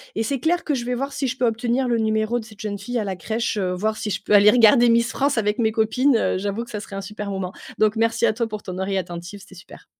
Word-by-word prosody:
et 225 - 0
c'est 275 +3 -2
clair 345 +6 +1
que 300 - -1
je 240 -3 -2
vais 250 0 -1
voir 275 +3 -3
si 275 - -2
je 250 +1 -3
peux 245 - +1
obtenir 235 +3 0
le 235 -1 +1
numéro 220 +2 0
de 225 - -9
cette 215 -2 -13
jeune 205 -2 -4
fille 245 +4 -4
à 220 - 0
la 195 -2 -3
crèche, 220 +5 -2
heu, 185 -2 -1
voir 215 +4 -1
si 210 - -4
je 195 +1 -3
peux - - 0
aller 205 +1 +8
regarder 240 +1 +6
Miss 235 0 +3
France 280 -2 0
avec 210 +1 0
mes 220 -1 +2
copines. 235 +5 +2
Heu, 185 - 0
j'avoue 205 +3 -3
que 235 - -12
ça 210 - -4
serait 200 - -9
un 195 - -4
super 210 0 -6
moment. 190 -1 -4 0.2
Donc 215 0 +2
merci 230 +1 +1
à - - +2
toi 230 0 -2
pour 215 -1 -7
ton 185 -2 -6
oreille 195 0 -1
attentive, 175 +2 -6
c'était 195 -1 -15
super. 180 - -14
220 Hz, 300 wpm, -22 LUFS, 200-240 Hz, 0.2 s, aller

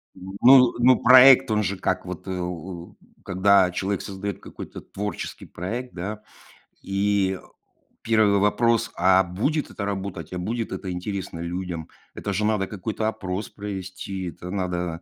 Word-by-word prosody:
Ну 120 +7 +5
ну 125 +1 +5
проект 130 -1 +8
он 105 0 +2
же 100 -1 -2
как - - -1
вот, - - -7
э, - - -3
о, 90 0 -6 0.3
когда 95 0 +4
человек 95 +2 -2
создает 100 0 -5
какой-то - - -9
творческий 105 +1 -6
проект, 120 +9 -5
да, 105 +4 -6 0.6
и 100 -1 0 0.6
1 110 -3 +3
вопрос: 115 +2 +2
а 95 +1 +4
будет 110 - -1
это 100 - -5
работать, 95 -5 -5
а 90 - -3
будет 115 +5 -3
это 95 - -5
интересно 90 -1 -5
людям? 85 -1 -4 0.3
Это 100 - -4
же 105 +3 0
надо 105 -3 +1
какой-то 110 +2 -3
опрос 95 -2 -4
провести, 95 -2 -6
это 90 +2 -9
надо, 90 -3 -3
100 Hz, 145 wpm, -24 LUFS, 90-105 Hz, 0.6 s, проект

